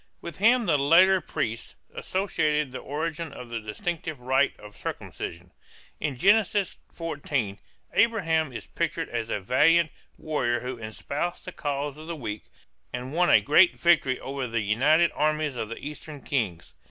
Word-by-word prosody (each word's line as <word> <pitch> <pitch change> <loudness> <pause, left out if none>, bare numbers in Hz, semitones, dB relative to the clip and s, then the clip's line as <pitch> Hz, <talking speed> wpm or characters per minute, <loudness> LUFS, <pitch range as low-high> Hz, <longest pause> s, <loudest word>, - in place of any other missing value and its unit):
With 170 -4 -8
him 235 +4 +4
the 150 - +3
later 185 +6 +6
priests 115 -8 -4 0.2
associated 150 -7 0
the 130 - -5
origin 160 +2 -4
of 125 -3 -10
the 115 - -2
distinctive 155 - -4
rite 130 +2 +1
of 105 -1 -12
circumcision. 85 +1 -6 0.5
In 145 -3 -2
Genesis 200 - +3
14 140 - -3 0.3
Abraham 165 - +2
is 120 - -7
pictured - - -2
as - - -3
a - - -1
valiant 155 - +4 0.3
warrior 120 -6 -1
who 125 -1 -5
espoused 140 +10 -4
the 180 - -6
cause 145 -3 -3
of 155 +1 -10
the 170 - -4
weak 110 -7 -6 0.5
and 125 +2 -5
won 175 +2 +3
a - - +7
great 170 +5 +5
victory 155 -7 +3
over 135 -1 -4
the 115 -1 -1
united 145 +11 +3
armies 155 -1 0
of 110 -3 -4
the 115 - -6
Eastern 150 0 -8
kings. 110 - -2
145 Hz, 155 wpm, -26 LUFS, 125-165 Hz, 0.5 s, a